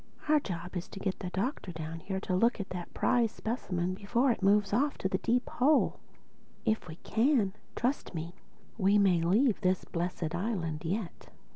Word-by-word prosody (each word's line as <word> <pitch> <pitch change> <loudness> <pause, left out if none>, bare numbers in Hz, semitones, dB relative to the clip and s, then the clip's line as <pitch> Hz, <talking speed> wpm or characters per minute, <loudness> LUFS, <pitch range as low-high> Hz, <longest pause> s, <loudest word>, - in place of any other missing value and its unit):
Our 305 0 +5
job 180 -6 -6
is 175 - -3
to - - -9
get 190 -1 -2
the 185 - -4
Doctor 195 +1 -2
down 160 0 -6
here 190 +3 -3
to 185 -3 -1
look 230 +5 +3
at 200 - -4
that 180 -1 -5
prize 235 -3 +2
specimen 185 -7 -2
before 235 +7 +1
it 230 - -2
moves 200 0 +3
off 280 +6 +2
to - - -1
the 190 0 -1
Deep 245 +2 +1
Hole. 290 +4 +3 0.7
If 220 -5 0
we 155 - -7
can, 260 +6 +3
then 195 -5 +1 0.2
trust 250 -6 -1
me, 165 +2 -4 0.5
we 200 +1 +4
may 190 -4 +4
leave 210 +8 +3
this 185 -2 +1
blessed 170 -1 -3
island 175 -5 -2
yet. 185 +2 -4
195 Hz, 185 wpm, -31 LUFS, 175-230 Hz, 0.7 s, Our